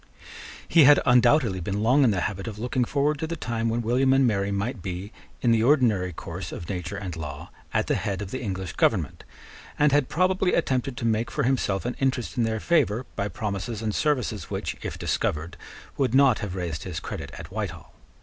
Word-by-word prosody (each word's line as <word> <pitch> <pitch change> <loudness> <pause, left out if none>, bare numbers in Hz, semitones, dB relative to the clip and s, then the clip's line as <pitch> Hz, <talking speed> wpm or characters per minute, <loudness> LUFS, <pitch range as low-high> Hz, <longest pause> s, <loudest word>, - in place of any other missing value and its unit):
He 165 -4 +6
had 145 +2 +8
undoubtedly 125 -4 +4
been 100 +4 -2
long 130 +5 +4
in 125 - +5
the 95 -4 0
habit 100 +2 -3
of 105 -2 -6
looking 125 +2 0
forward 145 +3 0
to 160 - -2
the 170 - -3
time 115 -6 -2
when 115 +1 -1
William 130 +4 +3
and 135 0 +4
Mary 100 -4 +1
might 100 +3 -2
be, 95 +3 -5 0.3
in 120 - +4
the 115 -1 +3
ordinary 115 -8 +3
course 80 - -7
of 85 - -7
nature 95 0 -4
and 95 -4 -5
law, 75 -3 -7 0.2
at - - +1
the - - 0
head 95 -2 -2
of 105 -2 -6
the 130 - -4
English 95 -5 -4
government, - - 0 0.5
and 150 0 +4
had 145 -2 +2
probably 185 +2 +2
attempted 130 -5 0
to 120 - -3
make 115 +1 +1
for - - -1
himself 120 -7 0
an 125 - -2
interest 130 -3 -1
in 120 -3 +1
their 110 0 -1
favour, 130 -6 +1
by 100 -1 -1
promises 105 +3 -4
and 110 -1 -1
services 125 - -1
which, - - -3
if - - -5
discovered, 80 +3 -2 0.4
would 130 -3 +1
not 135 -4 +5
have 100 -3 -4
raised 85 -4 -3
his 85 -2 -5
credit - - -6
at - - -9
Whitehall. - - -5
115 Hz, 205 wpm, -25 LUFS, 100-130 Hz, 0.5 s, had